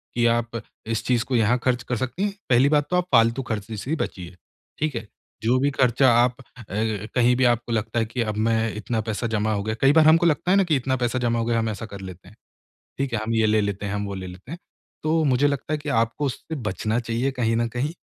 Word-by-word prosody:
कि 120 0 +2
आप 115 0 -1 0.3
इस 115 -1 -1
चीज़ 120 -2 +2
को 130 - -1
यहाँ 115 +2 +3
ख़र्च 125 -2 +1
कर 125 - -2
सकती 130 - -3
हैं, 205 -1 0 0.2
पहली 125 +3 +5
बात 150 -1 +3
तो 180 - 0
आप 180 - +2
फ़ालतू 115 +1 +4
ख़र्चे 110 -2 -4
से 115 - -7
ही 160 - +2
बचिए, 90 - -5 0.4
ठीक 150 -4 -1
है? 115 -1 -5 0.4
जो 120 +3 +3
भी 140 - +2
ख़र्चा 130 0 +3
आप 125 +1 +3
अ, - - -16 0.3
कहीं 110 +4 0
भी 130 - +1
आपको 120 0 +1
लगता 115 +1 -1
है 115 - +1
कि 115 +2 -4
अब 110 -2 -2
मैं 115 -1 +2 0.2
इतना 110 +1 -2
पैसा 110 +2 -3
जमा 110 -1 0
हो 100 -1 -1
गया 110 +1 -2
कई 135 - +6
बार 160 0 +6
हमको 165 +2 +5
लगता 170 +2 +2
है 195 - +5
ना 195 - +5
कि 170 -4 +1
इतना 130 0 -1
पैसा 120 0 -1
जमा 120 -1 0
हो 115 - -1
गया 115 -1 +1
हम 115 - -1
ऐसा 110 +1 -5
कर 100 -3 -9
लेते 95 -1 -10
हैं, 105 - -19 0.6
ठीक 135 -2 -2
है? 115 - +1
हम 115 +1 -2
ये 110 -1 +3
ले 110 0 +3
लेते 100 0 -3
हैं, 100 - -3
हम 105 0 -2
वो 100 -1 -5
ले 95 -1 -6
लेते 90 +8 -11
हैं। 170 - -5 0.5
तो 160 +1 +2
मुझे 140 +1 +3
लगता 145 +2 -2
है - - +1
कि 145 0 -5
आपको 115 +3 0
उससे 145 +4 -4
बचना 110 -2 -2
चाहिए 120 +3 -1
कहीं 120 -3 0
न 115 0 +1
कहीं 125 +7 -2
120 Hz, 265 wpm, -24 LUFS, 110-130 Hz, 0.6 s, कई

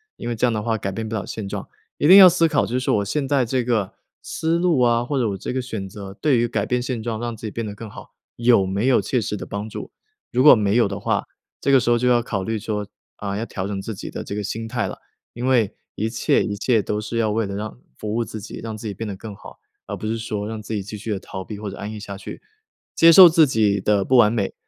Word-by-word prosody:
因 - - -7
为 120 - -2
这 120 - +1
样 - - +1
的 105 - -1
话 110 0 -1
改 95 -1 -3
变 110 +3 -4
不 110 - -6
了 100 - -3
现 105 -3 -6
状。 - - -5 0.3
一 145 - +2
定 190 +3 +10
要 190 -2 +11
思 165 -1 +4
考， 150 -3 +1
就 125 - -2
是 130 - -3
我 100 -1 +1
现 140 +6 -1
在 135 -3 +2
这 125 +1 0
个 110 -6 -1 0.3
思 165 +1 -1
路 170 -6 +2
啊， 120 -1 +3
或 140 +1 -2
者 115 -4 +1
我 100 - -3
这 125 - -5
个 130 - -1
选 110 -6 -5
择， 95 0 -9
对 140 -1 +2
于 120 0 +2
改 110 -3 -1
变 125 +1 0
现 125 -3 -3
状 115 -2 -3
让 120 -1 -3
自 110 - -10
己 - - -6
变 115 -1 -4
得 105 - -5
更 110 0 -9
好， - - -12 0.2
有 115 -5 +4
没 100 +5 -1
有 130 - +4
切 125 -3 -1
实 105 - -3
的 - - -7
帮 100 +2 -5
助。 - - -8 0.4
如 125 +1 +2
果 150 - +9
没 105 0 +1
有 115 - +4
的 100 0 -5
话， - - -1 0.4
这 140 - +1
个 135 - +7
时 120 - -1
候 120 - +4
就 125 +1 0
要 120 -1 +4
考 100 -5 -3
虑 110 +1 -2
说， 105 -1 -3 0.3
啊， 100 -1 -4
要 115 - -3
调 95 -4 -5
整 100 -1 -4
自 110 - -5
己 - - -7
的 - - -6
这 100 - -5
个 105 - -3
心 115 +3 -4
态 120 0 -2
了。 - - -7 0.4
因 120 +2 -5
为 120 -6 +2 0.2
一 110 +2 -1
切 115 - +1
一 105 - -3
切 115 0 +2
都 105 +1 -2
是 110 +2 -6
要 110 -2 +1
为 110 0 0
了 100 0 -5
让 105 - -5 0.2
服 105 0 -4
务 115 0 0
自 110 - -8
己， 105 - -8
让 110 -1 -5
自 110 +1 -7
己 100 - -4
变 110 +3 -6
得 100 - -5
更 105 +1 -9
好， - - -13 0.3
而 - - -5
不 - - -8
是 115 +1 -1
说 105 -2 -4
让 110 -1 -5
自 110 - -6
己 105 - -1
继 105 +2 -7
续 110 +2 -5
地 100 - -1
逃 95 -1 -7
避 105 - -7
或 105 -1 -5
者 - - -9
安 105 +2 -5
逸 - - -7
下 100 -2 -7
去。 - - -9 0.5
接 165 - +6
受 180 +1 +11
自 160 -1 +5
己 105 -5 +2
的 105 -1 +2
不 130 - +2
完 105 -3 +6
美， 105 -4 -1
110 Hz, 320 characters per minute, -22 LUFS, 105-120 Hz, 0.5 s, 要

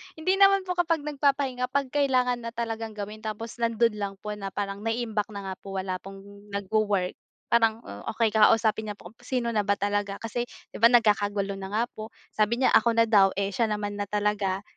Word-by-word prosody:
Hindi 320 +4 +1
naman 395 0 +6
po 370 - -4
kapag 330 -3 +1
nagpapahinga, 275 -3 0
'pag 275 0 -1
kailangan 255 -4 +2
na 230 0 -7
talagang 225 -1 -4
gawin 210 +1 -6
tapos 220 +2 -6
nando'n 230 0 +2
lang 200 -1 -3
po 210 - -4
na 205 -2 -5
parang 200 -1 -3
naiimbak 225 -1 -2
na 200 -1 -5
nga 185 - -5
po 195 0 -8
wala 185 -1 -2
pong 195 +1 -11 0.3
nagwo-work. 200 -2 0 0.4
Parang, 225 -1 +3
oh - - -9
okey 225 0 +1
kausapin 220 0 +3
niya - - -7
po - - -13
kung 230 - -31
sino 245 -1 -1
na 215 -2 +1
ba 200 - +3
talaga, 205 0 -1
kasi 240 +2 -3 0.2
'di - - -8
ba 230 - +8
nagkakagulo 205 -4 +2
na 190 - -5
nga 225 +2 +2
po, 215 0 -8 0.2
sabi 215 +3 +1
niya 265 - +3
ako 230 +1 +4
na 230 - +5
daw, 200 -3 +5
eh 200 0 -1
siya 225 +4 +1
naman 205 -1 -2
na 205 - -2
talaga. 205 -1 -1
220 Hz, 205 wpm, -27 LUFS, 205-235 Hz, 0.4 s, ba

